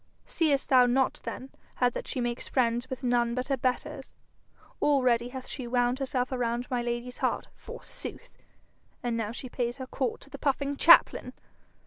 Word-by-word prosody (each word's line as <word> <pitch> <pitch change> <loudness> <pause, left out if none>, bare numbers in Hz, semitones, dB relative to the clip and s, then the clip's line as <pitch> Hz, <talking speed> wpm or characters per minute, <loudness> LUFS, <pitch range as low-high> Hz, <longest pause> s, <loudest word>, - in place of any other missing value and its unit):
'Seest 295 -5 +1
thou 255 -3 +6
not 260 +2 +1
then 265 - -6 0.2
how 250 - +3
that 245 - -4
she - - -3
makes 240 -1 -2
friends 240 0 +1
with 260 0 -6
none 240 -1 +2
but 255 +2 -3
her 275 - +3
betters? 255 0 -3 0.7
Already 250 -4 +3
hath 260 0 -7
she 255 -4 -5
wound 245 +1 +1
herself 255 -1 -1
around 240 -1 -1
my 245 -1 +1
lady's 240 +1 -4
heart, - - -1
forsooth! - - -9 0.7
and 240 -1 -1
now 220 -2 -2
she 255 +2 -7
pays 240 0 -2
her 260 - -5
court 255 -2 -2
to 280 - -15
the 280 - -8
puffing 280 0 0
chaplain! 335 +4 +6
250 Hz, 170 wpm, -28 LUFS, 240-265 Hz, 0.7 s, thou